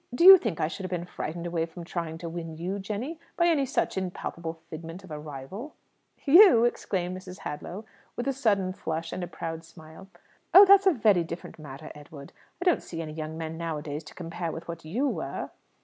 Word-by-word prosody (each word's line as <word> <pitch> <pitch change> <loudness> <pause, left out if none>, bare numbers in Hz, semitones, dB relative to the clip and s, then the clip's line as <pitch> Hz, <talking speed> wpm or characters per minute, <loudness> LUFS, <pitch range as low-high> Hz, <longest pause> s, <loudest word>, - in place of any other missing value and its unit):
Do 340 - +3
you 380 0 +12
think 215 - -3
I - - +2
should 180 +4 -6
have 185 - -4
been 175 -1 -3
frightened 170 -1 -5
away 170 -1 -1
from 170 +1 -9
trying 165 -2 -4
to 170 0 -6
win 165 -1 -6
you, 185 +4 -3
Jenny, 220 - -4 0.2
by 340 - +4
any 305 -6 +3
such 260 -7 0
impalpable 170 -2 -5
figment 165 +3 -8
of 185 - -13
a 150 - -5
rival?" 150 - -8 0.5
"You?" 310 - +8
exclaimed 185 -6 -1
Mrs. 185 0 -9
Hadlow, 180 +8 -6 0.3
with 245 - -3
a 275 - +1
sudden 200 -8 +1
flush 165 -2 -4
and 185 - -4
a - - -3
proud 165 -1 -6
smile. 160 +2 -14 0.5
"Oh, 390 +2 +12
that's 395 0 +7
a - - +8
very 215 - +3
different 165 0 -8
matter, 145 0 -9
Edward. 145 -1 -12 0.3
I 360 - -4
don't 355 - +4
see 165 - -7
any 155 -1 -7
young 155 0 -5
men 160 0 -5
nowadays 155 -2 -4
to - - -12
compare 170 -1 -4
with 165 +2 -8
what 170 -1 -7
you 225 - -1
were." - - -4
175 Hz, 210 wpm, -28 LUFS, 160-215 Hz, 0.5 s, you